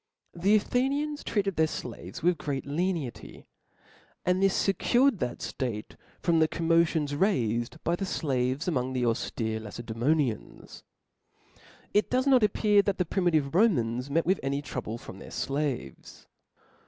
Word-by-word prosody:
The 190 +5 +3
Athenians 280 +7 0
treated 200 -4 -1
their 160 0 +4
flaves 155 - -7
with 175 -2 +2
great 140 -3 -3
lenity; 160 -3 -3 0.8
and 180 +1 +2
this 195 -1 +2
fecured 240 +5 +3
that 125 -4 -2
ftate 115 -5 -4 0.3
from 170 -2 +3
the 160 - +4
xommotions 165 -3 +1
raifed 120 - 0
by 170 - +1
the 195 - -3
flaves 135 -2 -1
among 130 -6 0
the 125 -1 0
auftere 115 -1 -1
jLacedsemontans. 120 +4 -2 0.5
' - - -27
It 210 - +2
does 255 +1 +1
not 265 -3 +5
appear 210 0 +4
that 200 -1 -1
thd 180 -3 -2
primitive 160 -7 +1
Romans 130 - +2
met 165 +4 +1
with 190 +2 +2
any 140 +1 -2
trouble 120 -5 -5
from - - -11
their - - -10
flaves. 135 - -4
160 Hz, 140 wpm, -28 LUFS, 125-195 Hz, 0.8 s, not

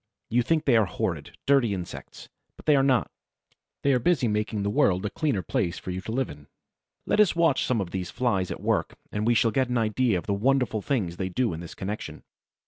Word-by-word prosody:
You 120 +2 +3
think 155 +6 +1
they 130 - +4
are 110 -3 +3
horrid, - - -4
dirty 130 -7 +3
insects; 90 -2 -8 0.3
but - - -15
they 150 - +5
are 135 - +4
not; 130 -3 +2 0.7
they 140 - +4
are 125 - +3
busy 130 -1 +2
making 105 -1 -1
the 100 - 0
world 95 -1 +2
a 105 - -2
cleaner 140 - -1
place 85 +2 -1
for 95 - -6
you 90 +1 -4
to 110 - -6
live 130 +2 0
in. 70 -1 -13 0.6
Let - - +1
us 210 -5 +5
watch 165 -5 +3
some 125 -3 +1
of 90 -3 -3
these 90 -2 -3
Flies 100 -8 0
at - - -6
work, - - 0 0.2
and 105 +2 -1
we 120 - +4
shall 115 -1 +3
get 130 +2 +1
an 125 - 0
idea 110 -1 +1
of 85 - -5
the 100 - 0
wonderful 125 +1 +1
things 95 -10 -1
they 95 -1 -2
do 120 +3 0
in 80 - -5
this 85 -1 -9
connection. 105 +3 -6
110 Hz, 230 wpm, -26 LUFS, 95-130 Hz, 0.7 s, they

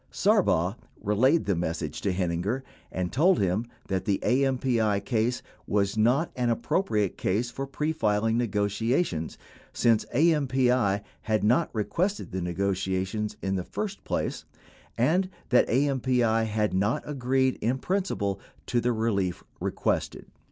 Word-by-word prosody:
Sarbaugh 105 - +2 0.2
relayed 130 +11 +2
the 100 - +1
message 80 -2 -3
to 100 - 0
Heininger, 90 +7 -1 0.3
and 90 -1 -2
told 175 +7 +4
him 100 +5 0 0.2
that 95 -1 -2
the 100 -2 +2
AMPI 125 -5 +2
case 120 0 0 0.2
was 100 0 +1
not 125 +9 +2
an 125 -1 0
appropriate 110 - 0
case 115 +6 0
for 135 +2 -5
pre 150 +3 -1
filing 110 -4 +1
negotiations 105 - 0 0.4
since 115 -2 +3
AMPT 130 -8 +2 0.2
had 110 -1 0
not 125 +10 +3
requested 175 - -1
the 95 0 -3
negotiations 95 +3 -2
in 95 - 0
the 90 - -2
first 205 - -5
place - - -2 0.5
and 175 +10 +2 0.2
that 125 - +4
AMPI 125 -4 +2
had 105 -1 0
not 100 +5 +1
agreed 130 -2 0
in 120 +4 +1
principle 130 - -1 0.3
to 120 -1 0
the 125 +1 +1
relief 100 -5 -1 0.2
requested. - - -2
115 Hz, 130 wpm, -27 LUFS, 100-130 Hz, 0.5 s, told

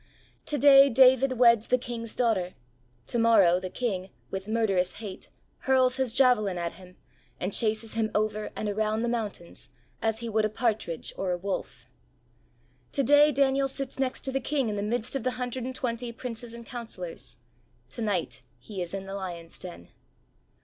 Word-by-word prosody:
To 295 - -1
day 275 -1 +8
David 260 +1 +5
weds 235 -3 +5
the 250 - +3
King's 235 -2 -6
daughter; 205 -7 0 0.5
to 235 - -1
morrow 200 -6 +5
the 185 0 -5
king, 190 -5 -3 0.2
with 190 +1 -5
murderous 205 -5 +1
hate, 205 -3 -8 0.3
hurls 260 -1 +3
his 260 -3 +1
javelin 235 -7 +3
at 170 -1 -2
him 180 -1 -15 0.4
and 185 +2 -3
chases 220 0 0
him 220 -1 0
over 215 0 0
and 215 - -3
around 215 +2 0
the - - 0
mountains 220 -7 -5 0.3
as 225 -1 +1
he 235 - -4
would 220 -1 +1
a 215 - +2
partridge 215 -7 -2
or 190 - -2
a 180 - 0
wolf. 190 +2 -5 1.1
To 275 - +1
day 290 +3 +6
Daniel 275 0 +2
sits 270 0 -6
next 265 -1 -1
to 265 - -4
the 270 - 0
king 275 -3 0
in 210 - -2
the 200 - -2
midst 230 +4 -2
of 270 - -1
the 255 +2 -1
hundred 250 0 -3
and 260 0 -5
twenty 240 -2 -3
princes 235 -1 -7
and 235 0 -10
counsellors; 220 - -6 0.5
to 135 - -6
night 185 - -1 0.2
he 185 - -7
is 175 +2 -4
in 195 0 -5
the 195 - -7
lions' 175 -4 -7
den. 175 - -10
225 Hz, 180 wpm, -27 LUFS, 195-250 Hz, 1.1 s, day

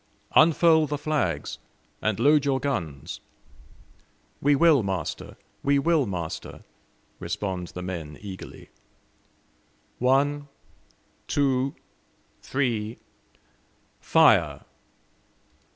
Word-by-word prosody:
"Unfurl 160 0 +5
the 145 +1 -2
flags, 155 0 -2 0.4
and 110 -1 -1
load 145 +3 +4
your 135 -2 +1
guns!" 85 - -4 1.2
"We 145 +1 +4
will, 155 -2 +5
master, 95 -3 -4 0.2
we 140 0 +2
will, 155 -2 +2
master!" 85 -4 -6 0.6
respond 95 -3 -4
the 90 - -8
men 80 -5 -6
eagerly. 95 -3 -10 1.3
"One, 145 +3 +2 0.8
two, 135 -1 +1 0.7
three, 115 -5 -2 1.0
fire!" - - +4
135 Hz, 80 wpm, -25 LUFS, 95-145 Hz, 1.3 s, Unfurl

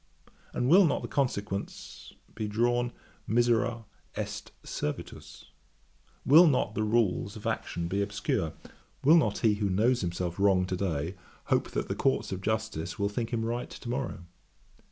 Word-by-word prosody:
_ - - -24 0.2
and 125 - -1
will 185 +8 +7
not - - -1
the - - -3
consequence 105 -7 -3 0.2
be 110 -1 -3
drawn, 120 +3 +1 0.4
misera 120 0 +2 0.3
est - - -5
servitus? 75 - -6 0.8
Will 165 +6 +8
not 125 -7 +1
the 110 - -1
rules 105 -3 +1
of 110 - -10
action 85 0 -2
be 100 +3 -1
obscure? 100 - -1 0.5
Will 155 +4 +7
not 110 -10 +2
he 110 - +5
who 100 - +1
knows 115 +6 +2
himself 90 0 -3
wrong 95 -2 +4
to 95 - -2
day, 85 -3 -2 0.4
hope - - +1
that - - -2
the - - -1
Courts 110 -6 0
of 95 0 -4
Justice 110 -6 -2
will 100 -1 0
think 115 +2 -3
him 115 -2 -1
right 120 +1 -3
to 120 - -9
morrow? 125 -8 -3
110 Hz, 160 wpm, -29 LUFS, 95-120 Hz, 0.8 s, Will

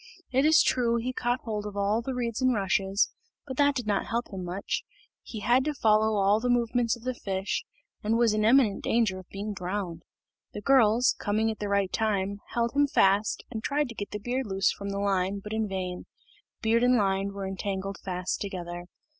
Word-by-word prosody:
It 265 +2 +3
is 315 +1 +6
true 235 -2 +2
he 240 +2 -2
caught 245 0 -1
hold 210 -2 -4
of 205 -1 -7
all 205 +3 +1
the 260 +2 -4
reeds 235 -1 -2
and 255 -1 +3
rushes, 195 0 +1 0.3
but 260 -2 -7
that 285 -1 +4
did 245 -4 -2
not 205 -2 0
help 235 +1 -2
him 185 -1 -4
much; 180 +3 -3 0.4
he 215 - -8
had 245 +4 +3
to 305 -1 -1
follow 220 -2 +3
all 200 +2 +3
the 245 +2 -1
movements 240 -1 +2
of 235 - -15
the 255 0 -1
fish, 195 -4 -3 0.4
and 220 +2 +1
was 235 -2 +3
in 215 0 +1
imminent 225 -3 +4
danger 220 -5 +1
of 185 - -14
being 205 +2 -5
drowned. 180 -3 -4 0.5
The 210 - -6
girls, 240 -1 +4
coming 220 +2 +1
at 220 - -8
the 205 - -3
right 200 -2 +1
time, 200 -2 0
held 235 0 +1
him 285 0 +4
fast 200 -4 +2
and 220 -2 -5
tried 290 -1 0
to 230 - -8
get 205 - -5
the - - -4
beard 245 +4 -2
loose 195 0 +2
from 200 0 -6
the 200 - -3
line, 195 -1 0
but 210 +2 -7
in 220 -1 0
vain 185 -2 -4 0.6
beard 225 +1 +3
and 250 0 +5
line 195 -2 +1
were 200 -1 -5
entangled 195 0 -4
fast 185 -1 -3
together. 175 -3 -5
210 Hz, 210 wpm, -28 LUFS, 195-240 Hz, 0.6 s, is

